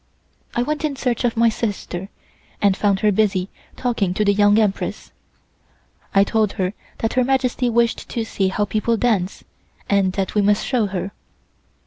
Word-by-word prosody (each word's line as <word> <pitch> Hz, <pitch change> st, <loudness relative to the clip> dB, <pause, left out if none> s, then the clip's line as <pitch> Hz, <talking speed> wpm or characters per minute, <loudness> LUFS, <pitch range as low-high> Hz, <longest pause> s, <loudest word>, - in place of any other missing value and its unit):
I 240 Hz, -, +2 dB
went 300 Hz, +3 st, -2 dB
in 300 Hz, -2 st, -1 dB
search 250 Hz, -3 st, -1 dB
of 235 Hz, -1 st, 0 dB
my 230 Hz, 0 st, +5 dB
sister, 200 Hz, -4 st, -4 dB, 0.5 s
and 200 Hz, -2 st, +3 dB
found 200 Hz, -1 st, +1 dB
her 210 Hz, -, +4 dB
busy 195 Hz, -2 st, +1 dB, 0.3 s
talking 215 Hz, -7 st, -1 dB
to 210 Hz, -, +1 dB
the 200 Hz, -, +4 dB
Young 205 Hz, +1 st, +4 dB
Empress. 210 Hz, -3 st, -1 dB, 1.0 s
I 195 Hz, -, +7 dB
told 215 Hz, 0 st, +1 dB
her 185 Hz, 0 st, -1 dB, 0.2 s
that 225 Hz, -, -1 dB
Her 255 Hz, -, +3 dB
Majesty 255 Hz, -1 st, +1 dB
wished 235 Hz, 0 st, +1 dB
to 230 Hz, -, -2 dB
see 195 Hz, -3 st, -1 dB
how 205 Hz, +2 st, 0 dB
people 220 Hz, +2 st, 0 dB
dance, 205 Hz, -6 st, 0 dB, 0.4 s
and 195 Hz, -2 st, +2 dB
that 195 Hz, -1 st, -2 dB
we 210 Hz, -, +3 dB
must 205 Hz, +1 st, +2 dB
show 240 Hz, -6 st, +1 dB
her. 190 Hz, 0 st, -4 dB
210 Hz, 170 wpm, -21 LUFS, 195-235 Hz, 1.0 s, I